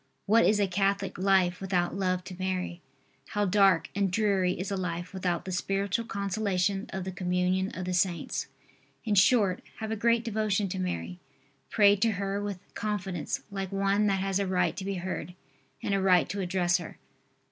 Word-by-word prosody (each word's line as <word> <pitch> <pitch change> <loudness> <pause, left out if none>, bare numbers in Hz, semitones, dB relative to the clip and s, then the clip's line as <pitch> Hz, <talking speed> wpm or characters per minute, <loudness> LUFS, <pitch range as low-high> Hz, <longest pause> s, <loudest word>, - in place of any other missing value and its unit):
What 225 +3 +5
is 210 0 +3
a 200 - +4
Catholic 195 0 0
life 185 -2 +3
without 180 -2 0
love 185 -2 0
to 185 - -8
Mary! 185 -2 -2 0.5
How 205 0 +2
dark 190 -4 +3
and 200 -1 +1
dreary 195 -2 +2
is 190 +2 -3
a - - 0
life 180 -1 -4
without 180 -3 -2
the 190 - -4
spiritual 195 +4 -1
consolation 200 -2 -1
of 190 -1 -4
the 190 - -4
Communion 180 +1 0
of 185 - -4
the 180 - -2
Saints! 180 -1 0 0.6
In 215 - +1
short, 200 -1 +4 0.2
have 220 -1 -4
a - - 0
great 230 +2 +2
devotion 215 -2 0
to 190 - -4
Mary. 90 - -3 0.5
Pray 205 -2 +5
to 220 +2 +2
her 200 +1 -2
with 205 -2 -3 0.2
confidence 195 -5 -3
like 195 -2 -4
one 195 +1 +2
that 195 -1 +1
has 195 0 0
a 200 - 0
right 180 -2 +1
to - - -4
be 195 0 -2
heard 180 0 -5 0.5
and 200 - 0
a 195 - +2
right 185 -3 +4
to 200 0 -3
address 180 -1 +1
her. 170 - -9
195 Hz, 185 wpm, -28 LUFS, 180-200 Hz, 0.6 s, What